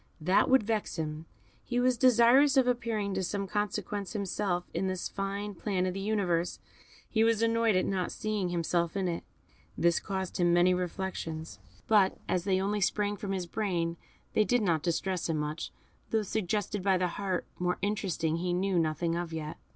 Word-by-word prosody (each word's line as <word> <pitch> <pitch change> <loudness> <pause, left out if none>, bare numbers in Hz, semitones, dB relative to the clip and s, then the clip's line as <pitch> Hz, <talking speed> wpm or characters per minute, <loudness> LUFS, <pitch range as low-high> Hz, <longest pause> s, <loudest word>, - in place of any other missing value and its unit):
That 180 +5 +3
would 265 -3 +5
vex 215 0 -1
him; 155 0 -4 0.4
he 245 0 -1
was 250 0 +3
desirous 255 +3 +5
of 260 - +6
appearing 230 -5 -1
of - - -1
some 200 +2 -2
consequence 205 -1 -3
himself 195 -3 -1
in 185 +3 -1
this 185 -1 -2
fine 200 +1 -4
plan 185 0 -1
of 185 - -1
the 195 - -4
universe, 190 -5 0 0.5
he 220 -1 +2
was 225 -1 +3
annoyed 230 -2 +3
at 185 - +2
not 185 -2 -1
seeing 210 -4 -2
himself 170 +1 0
in 190 -2 0
it. 170 -1 -3 0.5
This 170 0 +3
caused 190 -2 -4
him 175 -1 +3
many 175 +1 +5
reflections, 170 - -4 0.3
but 205 -3 +4
as 180 -1 0
they 190 -2 +2
only 205 +2 -1
sprang 205 +1 +1
from 200 0 -5
his 185 -2 -2
brain, 170 -3 -1 0.4
they 215 - +4
did 245 +1 +2
not 165 -5 +2
distress 180 +2 -1
him 160 - +1
much 150 +2 -3 0.4
those 220 -2 0
suggested 210 0 -1
by 190 0 +3
the 180 0 +1
heart, 190 0 -2
more 180 0 0
interesting, 190 -6 0
he 175 +1 -1
knew 185 0 +1
nothing 165 +1 0
of 170 -1 -3
yet. 155 -1 -5
190 Hz, 180 wpm, -30 LUFS, 175-210 Hz, 0.5 s, of